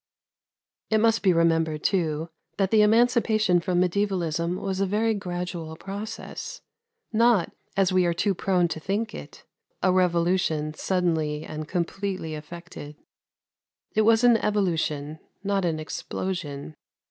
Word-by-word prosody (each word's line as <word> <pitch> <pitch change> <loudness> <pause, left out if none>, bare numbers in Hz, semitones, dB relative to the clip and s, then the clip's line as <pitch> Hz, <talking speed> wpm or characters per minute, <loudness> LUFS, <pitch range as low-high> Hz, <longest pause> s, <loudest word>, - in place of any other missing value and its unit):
It 220 - +3
must 225 +1 +3
be 190 - +4
remembered, 165 -2 +2
too, 165 -4 0 0.3
that 195 -2 +1
the 220 -1 +6
emancipation 220 -3 +4
from 175 +1 0
medievalism 180 -3 0
was 190 -1 -3
a 195 - +1
very 220 +3 +1
gradual 175 -4 -4
process, 220 - -7 0.5
not, 230 -4 +3 0.3
as 190 -1 +3
we 185 -1 +4
are 170 - +1
too 195 +3 +1
prone 180 -1 +1
to 160 - -4
think 205 +7 -2
it, - - -10 0.4
a 185 - +4
revolution 170 -4 +1
suddenly 160 -4 0
and 155 -1 -6
completely 185 -1 -3
effected. 155 -1 -9 1.0
It 220 - +3
was 225 +2 +4
an 240 -2 +6
evolution, 160 -8 -1 0.2
not 195 -2 0
an 160 -2 0
explosion. 155 -2 -5
180 Hz, 130 wpm, -26 LUFS, 165-205 Hz, 1.0 s, the